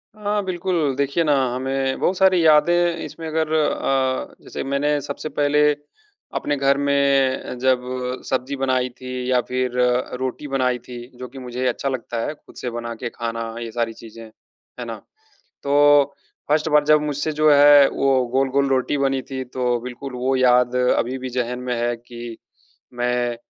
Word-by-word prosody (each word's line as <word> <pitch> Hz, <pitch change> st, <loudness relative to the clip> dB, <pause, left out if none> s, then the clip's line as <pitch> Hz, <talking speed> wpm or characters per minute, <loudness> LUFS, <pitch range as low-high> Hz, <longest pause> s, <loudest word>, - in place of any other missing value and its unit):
हाँ 210 Hz, -1 st, -1 dB
बिल्कुल, 175 Hz, -5 st, -1 dB
देखिए 140 Hz, +4 st, 0 dB
ना 150 Hz, -2 st, +2 dB, 0.2 s
हमें 135 Hz, +1 st, -1 dB
बहुत 185 Hz, -, +1 dB
सारी 185 Hz, -3 st, +4 dB
यादें 170 Hz, +3 st, +4 dB
इसमें 165 Hz, -1 st, -8 dB
अगर 160 Hz, 0 st, -1 dB
अ, 135 Hz, -4 st, 0 dB
जैसे -, -, -6 dB
मैंने 145 Hz, +2 st, 0 dB
सबसे 145 Hz, +2 st, -6 dB
पहले 145 Hz, 0 st, +1 dB, 0.8 s
अपने 145 Hz, -, -1 dB
घर 140 Hz, 0 st, +2 dB
में 140 Hz, -2 st, +1 dB
जब 130 Hz, 0 st, +2 dB, 0.5 s
सब्जी 130 Hz, +1 st, -1 dB
बनाई 130 Hz, -1 st, 0 dB
थी 130 Hz, -, -7 dB, 0.2 s
या 125 Hz, -1 st, +3 dB
फिर 125 Hz, 0 st, -1 dB, 0.5 s
रोटी 130 Hz, +3 st, -4 dB
बनाई 130 Hz, -2 st, 0 dB
थी 125 Hz, -, -8 dB, 0.2 s
जो 125 Hz, 0 st, -7 dB
कि 135 Hz, +2 st, -11 dB
मुझे 125 Hz, 0 st, -4 dB
अच्छा 125 Hz, +3 st, -1 dB
लगता 120 Hz, -3 st, -4 dB
है -, -, -3 dB
खुद -, -, -20 dB
से 125 Hz, -, -4 dB
बना 120 Hz, 0 st, -5 dB
के 120 Hz, +1 st, -5 dB
खाना 115 Hz, 0 st, -4 dB, 0.2 s
ये 115 Hz, -1 st, -5 dB
सारी 115 Hz, 0 st, -2 dB
चीज़ें, 115 Hz, 0 st, -12 dB, 0.6 s
है -, -, -4 dB
ना? -, -, -5 dB, 0.7 s
तो 145 Hz, 0 st, +4 dB, 0.3 s
फर्स्ट 150 Hz, +2 st, +2 dB
बार 150 Hz, -1 st, +4 dB
जब 150 Hz, 0 st, +5 dB
मुझसे 150 Hz, +1 st, -2 dB
जो 155 Hz, 0 st, +3 dB
है 145 Hz, -1 st, +7 dB
वो 135 Hz, -2 st, +1 dB
गोल-गोल 135 Hz, +1 st, +2 dB
रोटी 135 Hz, +2 st, +1 dB
बनी 135 Hz, -1 st, +1 dB
थी, 130 Hz, 0 st, -6 dB
तो 125 Hz, -1 st, -1 dB
बिल्कुल 125 Hz, +3 st, -7 dB
वो 130 Hz, +2 st, 0 dB
याद 125 Hz, -1 st, +3 dB
अभी 125 Hz, 0 st, +1 dB
भी 130 Hz, 0 st, -5 dB
ज़ेहन 125 Hz, 0 st, -2 dB
में 125 Hz, -1 st, -2 dB
है 120 Hz, 0 st, 0 dB
कि 120 Hz, -1 st, -9 dB, 0.6 s
मैं 120 Hz, 0 st, -1 dB
135 Hz, 170 wpm, -21 LUFS, 125-145 Hz, 0.8 s, है